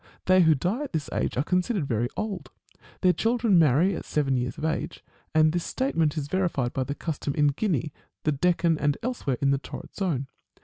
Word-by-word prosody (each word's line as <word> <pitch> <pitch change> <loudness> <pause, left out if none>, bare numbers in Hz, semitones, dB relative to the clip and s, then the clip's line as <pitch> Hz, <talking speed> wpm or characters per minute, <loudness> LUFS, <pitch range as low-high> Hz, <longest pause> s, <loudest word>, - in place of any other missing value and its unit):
They 185 0 +5
who 160 -2 +5
die 180 - -1
at 275 - -11
this 155 -3 -3
age - - -1
are 130 - +2
considered 180 +1 0
very 120 -2 -1
old. 215 -4 -4 0.5
Their 185 -1 +5
children 225 -4 +2
marry 165 +5 +4
at - - -5
seven 140 -3 0
years 125 +5 -2
of 155 - -3
age: 160 - -3 0.3
and 155 0 +5
this 175 +1 -1
state 270 +1 -2
ment 160 -1 +2
is 145 -2 -2
verified 165 -8 0
by 130 - -1
the 140 +2 -4
custom 145 -3 -3
in 145 -2 +4
Guinea, 150 - -1 0.3
the 155 - +2
Deccan, 170 +1 +2
and 145 0 +1
elsewhere 230 - -2
in 140 - +4
the 140 - +1
torrid - - -9
zone. 165 -9 -1
160 Hz, 210 wpm, -26 LUFS, 140-185 Hz, 0.5 s, They